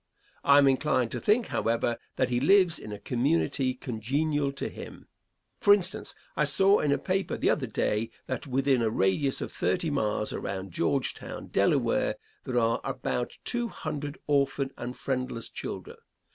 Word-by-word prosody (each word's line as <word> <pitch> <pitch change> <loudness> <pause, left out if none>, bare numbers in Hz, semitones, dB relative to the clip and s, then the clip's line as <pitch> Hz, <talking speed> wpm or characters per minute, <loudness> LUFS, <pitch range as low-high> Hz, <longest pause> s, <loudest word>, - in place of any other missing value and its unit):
I 140 0 +6
am 140 -1 +6
inclined 130 -3 +2
to - - -4
think, 220 +3 +2
however, 115 +1 0 0.2
that 130 - +1
he 120 - +2
lives 180 +4 +4
in 105 - -8
a 105 - -5
community 130 +1 0
congenial 140 +5 -1
to 140 - -4
him. - - -10 0.5
For 205 - +7
instance, 185 -2 -3 0.2
I - - +2
saw 190 +8 +5
in 145 - +1
a 140 - +3
paper 190 +1 -1
the - - +2
other - - -1
day 110 +2 -1 0.2
that 130 +2 -4
within 135 -1 +2
a 115 - +2
radius 110 +7 +1
of - - -4
thirty 175 -4 0
miles 105 -5 -1
around 95 -1 -4
Georgetown, 125 +11 -2
Delaware, - - +2 0.3
there 125 - -2
are 115 -1 +2
about 125 -2 -3
two 240 -1 -1
hundred 150 -7 -5
orphan 140 -1 +1
and 125 +1 -6
friendless 130 -3 -3
children. - - -7
135 Hz, 160 wpm, -28 LUFS, 120-150 Hz, 0.5 s, For